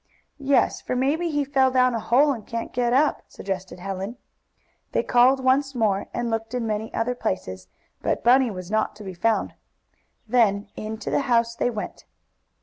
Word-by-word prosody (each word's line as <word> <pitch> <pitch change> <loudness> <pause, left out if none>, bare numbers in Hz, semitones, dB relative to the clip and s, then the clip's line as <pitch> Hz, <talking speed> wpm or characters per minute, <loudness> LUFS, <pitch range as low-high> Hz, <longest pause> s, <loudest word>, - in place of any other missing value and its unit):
"Yes, 275 -1 +2
for - - -3
maybe 295 +7 +1
he 290 -2 0
fell 265 -1 +3
down 255 -1 +3
a 230 - -1
hole, 275 +7 +3
and 225 -5 -8
can't 230 0 -5
get 240 -1 +1
up," 285 +4 +2
suggested 190 -2 -6
Helen. 195 +5 -5 0.8
They - - +1
called 260 +2 +4
once 270 +1 +2
more, 210 -4 +1
and 240 -1 -2
looked 225 +1 -3
in 245 -2 -1
many 220 0 -3
other 230 +2 -1
places, 95 - -4 0.3
but - - -1
Bunny 255 +1 +5
was 185 -2 -7
not 215 0 0
to 210 - -11
be 190 -2 -6
found. 220 +5 0 0.7
Then 215 -4 +2
into 220 +1 -5
the - - +2
house 230 -1 +2
they 245 - 0
went. 215 -3 -6
230 Hz, 175 wpm, -24 LUFS, 210-260 Hz, 0.8 s, Bunny